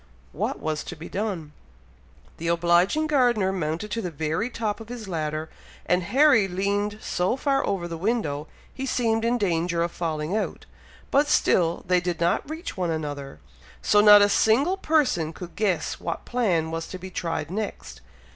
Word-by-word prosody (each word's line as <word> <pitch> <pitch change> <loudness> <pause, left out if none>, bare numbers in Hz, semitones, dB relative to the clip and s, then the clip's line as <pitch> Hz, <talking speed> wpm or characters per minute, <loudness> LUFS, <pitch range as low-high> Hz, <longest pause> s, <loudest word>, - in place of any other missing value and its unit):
What - - -3
was 155 -1 -2
to 175 - -7
be 160 +1 -9
done? 190 -7 -3 0.9
The 165 - -4
obliging 175 - +3
gardener 245 -10 +2
mounted 170 +2 -3
to 230 - -1
the 180 - -3
very 160 - -2
top 225 -3 -3
of 225 0 -11
his 240 -4 -7
ladder, 155 -3 -3 0.4
and 180 +1 +2
Harry 255 - +4
leaned 200 +3 -1
so 180 +8 0
far 275 0 +1
over 190 -4 -1
the 165 -1 -6
window, 160 -8 -1 0.3
he 270 0 -4
seemed 225 -3 +1
in 235 +1 +2
danger 170 -4 0
of 170 - -2
falling 160 +1 -2
out, 220 - -3 0.5
but 285 +2 +4
still 170 - +2
they 180 0 +4
did 175 -1 -2
not 170 - +1
reach 320 +3 -6
one 180 -2 -1
another, 145 - -4 0.4
so 205 - +5
not 210 -1 +9
a 205 - +4
single 255 - +3
person 280 - +1
could 175 +1 -9
guess 200 -6 -1
what 170 - -4
plan 180 -10 0
was 165 0 -4
to 185 - -7
be 185 +1 -9
tried 165 -3 -3
next. 195 - -5
185 Hz, 175 wpm, -25 LUFS, 165-225 Hz, 0.9 s, not